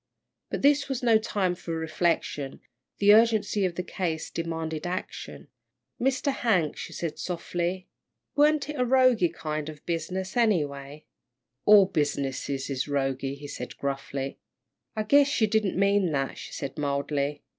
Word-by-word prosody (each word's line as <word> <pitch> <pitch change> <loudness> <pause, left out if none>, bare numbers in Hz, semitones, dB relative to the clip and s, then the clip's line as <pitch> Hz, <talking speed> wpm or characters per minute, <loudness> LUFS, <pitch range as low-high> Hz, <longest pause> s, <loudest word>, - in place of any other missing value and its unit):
But - - -4
this 285 0 +4
was 265 -1 -3
no 230 -2 +5
time 195 -4 0
for 170 -2 -5
reflection, 160 -3 -1 0.4
the 205 0 +6
urgency 215 -3 +3
of 175 -2 -2
the 180 - -2
case 170 -3 -3
demanded 165 0 -3
action. 185 +2 -6 0.5
"Mr. 270 +2 +1
Hank," 185 - +1
she - - -7
said, 165 -3 -4
softly, 175 +1 -3 0.5
"warn't 295 0 +3
it 300 - -5
a - - +4
roguey 250 -7 +4
kind 155 -1 -4
of 155 - -8
a - - -27
business, 185 +3 -3
anyway?" 150 - 0 0.6
"All 205 -2 +8
business 145 -7 -1
is 135 0 -2
roguey," 135 -1 -1
he 145 +1 -9
said, 145 - -7
gruffly. 135 0 -4 0.6
"I 215 - 0
guess 285 +5 +4
you 220 - +5
don't 210 -3 0
mean 200 -2 +3
that," 135 -1 -2
she - - -8
said, 140 +2 -5
mildly. 145 0 -1
175 Hz, 150 wpm, -27 LUFS, 145-215 Hz, 0.6 s, All